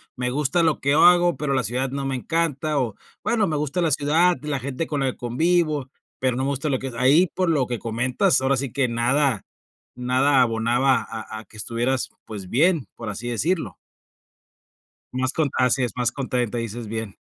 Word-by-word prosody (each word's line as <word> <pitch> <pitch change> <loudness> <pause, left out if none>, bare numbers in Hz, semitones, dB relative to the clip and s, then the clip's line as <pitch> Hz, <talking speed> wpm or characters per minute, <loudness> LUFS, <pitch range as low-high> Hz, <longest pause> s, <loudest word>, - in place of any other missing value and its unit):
me 125 -1 -2
gusta 150 +5 +1
lo 160 -2 +2
que 140 +1 +1
hago, 175 +2 +5
pero 145 -2 -2
la 130 - +1
ciudad 125 +5 -1
no 140 0 -4
me 135 -1 -1
encanta, 155 0 -1
o 115 -6 -2 0.3
bueno, 220 -3 +2
me 155 -4 -1
gusta 150 +4 -1
la 165 - +1
ciudad, 160 +6 +3
la 145 -3 -2
gente 140 +4 -3
con 145 -2 -2
la 135 - +1
que - - -16
convivo, 150 +2 0 0.3
pero 130 -1 0
no 130 - -1
me 140 - 0
gusta 140 +2 -2
lo 130 -2 0
que 135 -2 -5
ahí 145 +9 +5
por 185 -2 +1
lo 140 -6 +2
que 120 -1 -2
comentas, 125 - +1
ahora 135 +1 +2
sí 135 -2 -3
que 135 -3 +1
nada 120 +1 +1 0.5
nada 130 +2 +3
abonaba 120 +3 +2
a 110 -1 -6
a - - -10
que 110 - -17
estuvieras, 120 +4 -1
pues, 100 -4 -8
bien, 160 +2 +2
por 115 -2 -6
así 105 +4 -5
decirlo. 125 - -1 1.4
Más 130 +1 -1
con 155 -3 +1
así 125 0 +3
es 120 - -2
más 125 -1 +1
contenta, 125 -4 -2
dices 115 0 -5
bien. 110 -2 -5
130 Hz, 200 wpm, -23 LUFS, 120-150 Hz, 1.4 s, hago